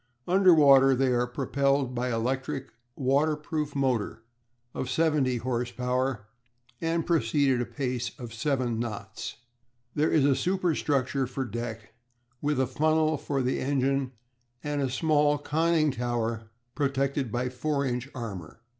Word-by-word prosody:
Under 185 +1 +5
water 135 -4 +6
they 130 +1 +2
are 120 0 +1
propelled 140 +1 0
by 125 +1 -1
an 120 - -1
electric 135 +3 -2 0.2
waterproof 150 +2 0
motor 125 -5 -1 0.5
of 130 - -4
seventy 145 -4 +2
horse 120 0 -2
power, 125 -3 -1 0.6
and 165 0 0
proceed 145 -4 +2
at 120 - 0
a 120 - -3
pace 125 -4 -2
of 120 -3 -8
seven 120 -1 -1
knots 110 -2 -5 0.6
per 145 - 0
hour. - - +2
There - - -2
is 150 -4 +4
a 140 -2 +4
superstructure 145 -8 0
for 130 +1 -3
deck, 115 -1 -6 0.5
with 145 -2 0
a 130 - +3
funnel 155 +4 +2
for 140 -2 -2
the 125 - 0
engine 135 -1 0 0.5
and 145 -1 -1
a 135 - 0
small 150 +1 +2
conning 155 +1 +1
tower 115 -3 -2 0.2
protected 140 -2 -1
by 125 +2 -1
4 140 +2 -1
inch 125 +1 -2
armour. 105 -8 -7
135 Hz, 145 wpm, -27 LUFS, 125-145 Hz, 0.6 s, water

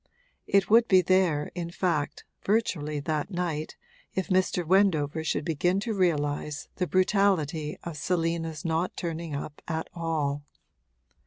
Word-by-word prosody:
It 200 0 +3
would 230 +2 +5
be 185 -1 +5
there 175 -5 +2
in 170 -1 -4
fact, 170 -4 -1 0.2
virtually, 160 -9 0
that 155 +2 -2
night, 175 -5 -3 0.4
if 190 - -1
Mr. 185 -2 +2
Wendover 160 -4 +2
should 155 -1 -1
begin 175 +4 +1
to 225 +1 -2
realise 150 -5 0
the 180 - 0
brutality 180 -6 +1
of 170 -3 -6
Selina's 165 -1 -1
not 165 +2 -1
turning 165 -3 -4
up 145 +1 -6
at 160 0 -2
all. 155 -4 -1
165 Hz, 135 wpm, -28 LUFS, 150-185 Hz, 0.4 s, would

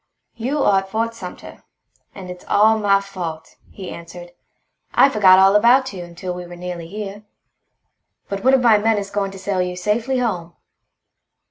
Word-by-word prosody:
"You 265 +5 -2
are 195 -1 +4
at 195 0 -9
Fort 230 +3 -2
Sumter. 190 -6 -10 0.5
And 185 -2 -8
it's 180 0 -11
all 220 +1 +4
my 200 -1 +3
fault," 175 -5 -7
he 190 -3 -9
answered. 175 +1 -10 0.6
"I 275 - +6
forgot 195 -6 +5
all 195 +1 +5
about 245 +3 +4
you 180 -2 -7
until 175 +1 -7
we 180 0 -7
were 175 - -10
nearly 175 -1 -7
here. 205 +2 -7 1.0
But 200 -1 -5
one 260 +1 +5
of 260 - +1
my 225 -4 +5
men 220 +1 +1
is 200 -1 -4
going 200 -1 -1
to 195 - -10
sail 190 -1 -2
you 180 0 -3
safely 220 +8 -1
home. 180 -9 -3
195 Hz, 175 wpm, -20 LUFS, 180-220 Hz, 1.0 s, I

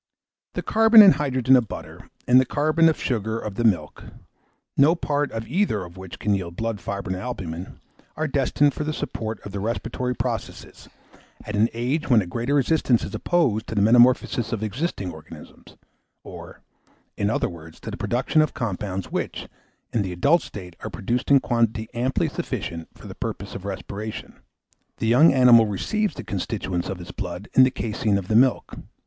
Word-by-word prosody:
The - - -3
carbon 225 0 +7
and 195 - +8
hydrogen 130 -2 +2
of 125 -3 +2
butter, - - -9 0.2
and 125 +1 +7
the - - +1
carbon 155 +5 +2
of 160 - +1
the - - -8
sugar 110 -3 -1
of 105 0 -4
milk, 90 -10 0 0.7
no 150 +5 +5
part 145 -4 -1
of 115 0 -5
either 170 - 0
of 85 0 -13
which 95 -1 -9
can 105 - 0
yield 90 -3 -3
blood, 115 0 -3
fibrine, 100 -2 -4
or - - -5
albumen, 95 -7 -6 0.4
are 155 +1 -1
destined 140 +1 +2
for - - -4
the 155 +1 -2
support 110 -7 -4
of 100 - -9
the 100 - -4
respiratory 120 +3 -3
process, 115 -1 -5 0.6
at 105 - -4
an 110 +3 +3
age 135 +8 -2
when 120 -4 +6
a 100 - -1
greater 120 +10 -2
resistance 135 -3 +2
is - - -6
opposed 125 -11 0
to 110 - -5
the 100 - +2
metamorphosis 120 +1 +4
of 110 -2 -3
existing 110 - -3
organisms; 80 -1 -13 0.5
or, - - -11 0.5
in 100 - 0
other 115 - 0
words, 80 -2 -11
to - - -6
the - - -5
production 130 +6 +1
of 155 - -1
compounds, 100 - -4
which, - - -4 0.5
in 115 - +1
the 95 -2 -3
adult 145 - +3
state, 90 -4 -10
are - - -6
produced 120 +5 -3
in 140 -1 +7
quantity 115 -3 0
amply 125 +3 0
sufficient 85 -1 -5
for - - -15
the - - -8
purpose - - -6
of 95 - -8
respiration. 100 +3 -6 0.6
The - - -3
young 125 +9 +6
animal 125 -4 +6
receives 210 - -1
the - - -7
constituents 90 -2 -3
of 95 -2 -5
its 90 - -9
blood 90 0 -6
in - - +6
the 130 - +6
caseine 110 -3 -1
of 95 -2 -6
the 110 - +1
milk. 125 +2 +3
115 Hz, 185 wpm, -23 LUFS, 100-135 Hz, 0.7 s, and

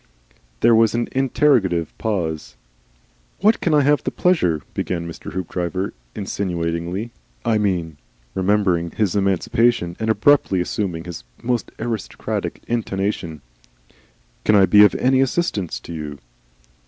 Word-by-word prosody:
There 115 0 +6
was 115 0 +4
an 120 - 0
interrogative 125 - +2
pause. 80 - -2 0.9
"What 215 +3 +4
can 165 -3 +2
I 150 - +5
have 145 +1 +3
the - - -1
pleasure 90 - +1
" - - -34
began 85 -2 -3
Mr. 85 - -8
Haopdriver, 90 +1 -3 0.2
insinuatingly. 90 +1 -3 0.3
"I 110 -2 +2
mean" 85 -7 -1 0.4
(remembering 95 -3 +1
his 100 +2 -1
emancipation 100 -1 +1
and 110 - -1
abruptly 110 -3 +3
assuming 90 -2 -2
his 85 -2 -8 0.2
most 120 -1 -1
aristocratic 115 -5 -4
intonation), 95 -8 -2 1.0
"can 110 - +4
I 100 -2 +7
be 105 +3 +7
of 105 - +5
any 130 +1 +3
assistance 130 - -1
to 85 - -9
you?" 75 -3 -6
100 Hz, 130 wpm, -21 LUFS, 85-115 Hz, 1.0 s, I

